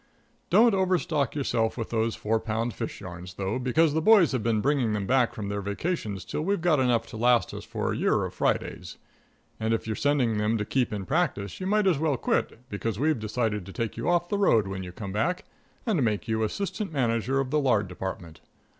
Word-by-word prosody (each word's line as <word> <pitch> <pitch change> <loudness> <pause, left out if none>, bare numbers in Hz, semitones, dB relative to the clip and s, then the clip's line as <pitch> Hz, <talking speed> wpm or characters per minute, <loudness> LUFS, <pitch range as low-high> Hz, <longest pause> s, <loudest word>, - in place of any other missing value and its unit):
Don't 235 -1 +6
overstock 180 -8 +1
yourself 120 -6 0
with 115 - -4
those 115 0 0
four 110 +1 0
pound 115 +1 -2
fish - - -5
yarns, 90 -1 -8
though, 100 +5 -2
because 145 +5 +2
the 160 - +1
boys 205 -3 +6
have 130 -3 -1
been 115 -1 +1
bringing 130 -3 +1
them 105 -2 -1
back 125 +1 +3
from 105 -2 -4
their 100 0 -2
vacations 100 - -3
till - - -3
we've 195 +4 0
got 160 -4 +3
enough 120 -3 +2
to 110 - -9
last 120 +1 +3
us - - -6
for - - -2
a - - -3
year - - +1
of - - -6
Fridays. - - -2 0.6
And 110 0 +1
if - - -5
you're 110 -1 -2
sending 130 -6 +1
them 110 +2 +1
to 105 - -2
keep 125 +1 0
in 100 -3 -4
practice, 135 - -1
you 185 - -3
might 210 +1 +2
as 175 -7 +3
well 150 -4 +1
quit, 125 +1 -1
because 105 -1 -3
we've 150 +1 +1
decided 110 -1 -1
to - - -7
take 110 +4 -3
you - - -2
off 175 0 +2
the 200 +2 -1
road 115 - +4
when 95 0 -4
you 90 -1 -7
come 100 +2 -7
back, 175 - -1 0.4
and 210 - +1
make 105 -1 -1
you 110 0 0
assistant 190 - -2
manager 125 -1 0
of 135 -1 -2
the 150 - +3
lard 120 -8 +2
department. 90 -3 -6
115 Hz, 220 wpm, -27 LUFS, 105-150 Hz, 0.6 s, Don't